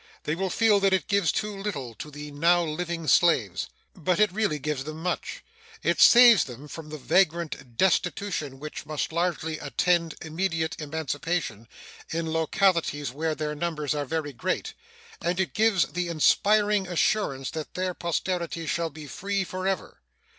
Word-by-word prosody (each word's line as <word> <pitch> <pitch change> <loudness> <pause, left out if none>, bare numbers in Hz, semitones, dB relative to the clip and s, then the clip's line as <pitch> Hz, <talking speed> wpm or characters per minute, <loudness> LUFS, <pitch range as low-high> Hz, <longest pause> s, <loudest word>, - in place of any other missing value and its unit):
They 150 - -1
will 190 +3 -1
feel 215 +1 +4
that 195 -1 +3
it 190 - +1
gives 200 -6 +2
too 210 -1 -2
little 170 - -4
to 150 - -8
the 150 0 -8
now 170 +4 +3
living 170 +1 -3
slaves. 105 - +3 0.3
But 175 +3 0
it 210 -2 +4
really 210 -7 0
gives 150 -1 -3
them 155 +2 -7
much. 180 -1 -3 0.4
It - - +1
saves 240 -3 +8
them 130 +3 -10
from 155 +1 -9
the 155 - -6
vagrant 155 -7 0
destitution 180 -6 0
which 150 +1 -7
must 155 0 -2
largely 165 -2 -1
attend 165 +4 +1
immediate 160 0 -2
emancipation 150 - -3 0.4
in 160 -1 -2
localities 160 -4 +1
where 155 +3 -2
their 150 -1 -3
numbers 150 -1 -2
are 145 -1 -2
very 145 0 -3
great, 120 - -2 0.5
and 175 +2 -1
it 190 - 0
gives 215 -4 +3
the 175 +3 -2
inspiring 205 +5 +3
assurance 165 -6 0
that 155 -1 -6
their 185 0 -1
posterity 170 -1 -2
shall 165 +1 -1
be 155 0 -10
free 195 +7 -2
forever. 185 0 -3
165 Hz, 155 wpm, -26 LUFS, 150-185 Hz, 0.5 s, saves